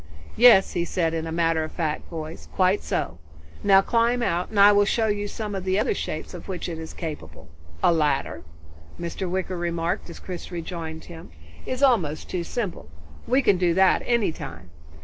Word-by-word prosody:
"Yes," 230 -5 +7
he 175 - 0
said, 170 -2 -1
in 165 0 -2
a - - -4
matter 165 -1 +1
of 155 - -6
fact 155 -3 -3
voice, 160 -1 -7
"Quite 185 +2 +3
so. 80 +1 -3 0.4
Now 195 -1 +6
climb 235 +3 +1
out 175 -5 0
and 210 - -1
I 200 +1 +9
will 205 0 +5
show 220 +2 +1
you 205 -1 -1
some 210 0 -5
of 190 -2 -3
the 190 0 +1
other 210 - +1
shapes 155 -5 -5
of - - -9
which 185 -2 -4
it 165 -2 -5
is 160 0 -7
capable. 80 - -8 0.3
A - - +5
ladder," 150 -3 0 0.6
Mr. 170 +2 -4
Wicker 185 0 -2
remarked 170 0 -2
as 170 - -9
Chris 180 -1 -7
rejoined 165 -2 -6
him, 170 0 -11 0.4
"is 255 +2 -2
almost 180 - +2
too 180 -2 -1
simple. 180 - -4 0.4
We 260 +2 +3
can 200 -5 +4
do 175 -2 +2
that 190 0 +4
at - - -11
any 235 -7 +2
time." 85 - -9
175 Hz, 195 wpm, -24 LUFS, 160-205 Hz, 0.6 s, I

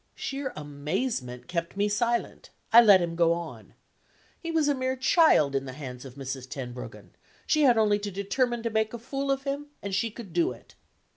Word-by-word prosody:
Sheer 275 0 -4
amazement 145 - -4
kept 170 +1 -3
me 205 +1 +2
silent: 235 +3 -1 0.2
I 235 - +11
let 200 -5 +7
him 170 -1 -3
go 170 -1 +4
on. 170 -1 -8 0.6
He 335 - -6
was 320 -3 +2
a 290 - +3
mere 260 -1 -1
child 260 - +4
in 135 0 -1
the 130 - -7
hands 130 -3 -8
of 130 -1 -10
Mrs. 135 -1 -6
Tenbruggen: 125 -2 -8 0.3
she 305 -1 +3
had 245 -3 +5
only 210 -2 +3
to 205 0 -4
determine 230 +5 -1
to 230 - -1
make 220 +1 0
a - - -4
fool 275 +4 -4
of 275 0 0
him, 280 +1 -3
and 200 -1 -6
she 190 +5 +1
could 210 -5 -10
do 170 -7 +2
it. 115 - -18
205 Hz, 200 wpm, -27 LUFS, -, 0.6 s, I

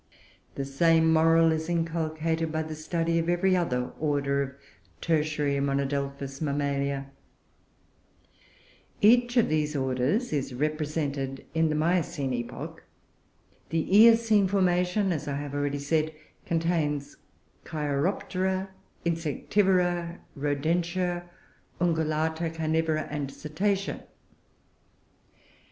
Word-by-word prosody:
The 135 - -3
same 160 +3 +3
moral 165 0 +5
is 160 +1 -2
inculcated 165 -1 -1
by 160 0 -1
the 155 0 -6
study 165 +2 -1
of 165 +1 -1
every 185 +2 +3
other 125 -9 -1
order 140 -2 +1
of 135 -1 -4 0.5
Tertiary 150 - 0
monodelphous 140 0 -2
Mammalia. 140 -2 -1 1.9
Each 240 +3 +4
of 235 - +5
these 150 -1 0
orders 135 - 0
is 135 -3 -2
represented 145 -2 -2
in 160 0 +2
the 155 - 0
Miocene 155 -4 0
epoch: 120 -1 -6 0.9
the 165 - -1 0.2
Eocene 225 -2 +6
formation, 185 +1 +2
as 155 -3 -3
I 140 - -2
have 145 0 -5
already 145 0 -1
said, 155 +2 0 0.3
contains 160 -4 -1 0.5
Cheiroptera, 185 +6 -1 0.4
Insectivora, 175 +2 +1 0.2
Rodentia, 175 +5 -1 0.5
Ungulata, 160 -1 0
Carnivora, 160 -1 0
and 145 -2 -3
Cetacea. 195 +8 -2
160 Hz, 100 wpm, -27 LUFS, 145-175 Hz, 1.9 s, Eocene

